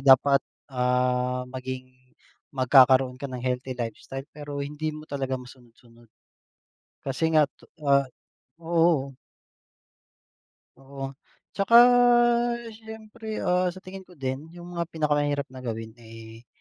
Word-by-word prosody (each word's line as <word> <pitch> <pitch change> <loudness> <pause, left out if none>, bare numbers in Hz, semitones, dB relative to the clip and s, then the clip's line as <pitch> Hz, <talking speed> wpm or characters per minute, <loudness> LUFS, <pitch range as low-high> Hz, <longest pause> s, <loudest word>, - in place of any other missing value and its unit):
dapat, 135 +1 +6 0.3
ah, 125 0 +1
maging 130 0 -6 0.6
magkakaroon 130 0 +5
ka 140 - -4
ng 125 -1 -6
healthy 125 0 -2
lifestyle, 125 +3 -5
pero 145 -1 -5
hindi 150 +2 -4
mo 155 - -10
talaga 135 -3 -3
masunod-sunod. 120 -2 -16 1.0
Kasi 160 +4 -1
nga 155 - +7 0.2
to - - -19 0.2
ah, 140 -1 +3 0.5
oo. 165 -5 +1 1.6
Oo, 135 0 -7 0.4
tsaka 200 +3 +2 1.0
siyempre, 220 0 -8
ah, 180 0 +2
sa 185 +1 -6
tingin 190 0 -10
ko 180 - -17
din, 135 +2 -4
yung 175 0 -10
mga 170 -1 -3
pinakamahirap 145 -3 0
na 130 - -10
gawin, 115 -2 -5
eh, 115 0 -13
135 Hz, 115 wpm, -26 LUFS, 125-160 Hz, 1.6 s, nga